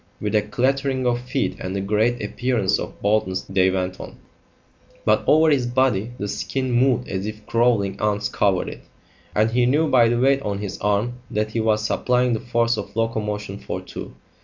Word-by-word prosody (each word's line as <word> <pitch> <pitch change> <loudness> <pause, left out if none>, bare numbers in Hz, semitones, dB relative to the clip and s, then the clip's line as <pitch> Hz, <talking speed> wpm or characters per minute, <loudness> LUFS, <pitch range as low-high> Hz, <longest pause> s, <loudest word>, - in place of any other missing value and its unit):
With 105 0 -3
a 105 - +4
clattering 130 +4 0
of 120 0 +1
feet 130 +2 -2
and 95 +1 -4
a - - 0
great 110 +4 +1
appearance 105 -2 0
of - - -7
boldness 100 -3 +1
they 95 -1 +2
went 95 -1 -2
on, - - -9 0.9
but - - +3
over 155 +1 +5
his 130 -4 +2
body 120 -3 +1
the 100 - -3
skin 130 +5 -2
moved 125 +1 +2
as 95 +1 -3
if 110 0 -8
crawling 110 -5 +1
ants 105 -1 0
covered 100 -3 +1
it, - - -10 0.5
and 110 +1 +3
he 120 +1 +2
knew 150 +5 +3
by 120 -5 +5
the 120 0 +1
weight 135 +2 +3
on 100 -5 -2
his 100 -1 -5
arm 105 +4 0
that 110 -2 -1
he 115 - -2
was 110 -1 +1
supplying 125 +1 +1
the 110 - 0
force 115 -1 0
of 105 - -6
locomotion 105 -3 -2
for - - -5
two. - - -9
110 Hz, 190 wpm, -22 LUFS, 105-125 Hz, 0.9 s, over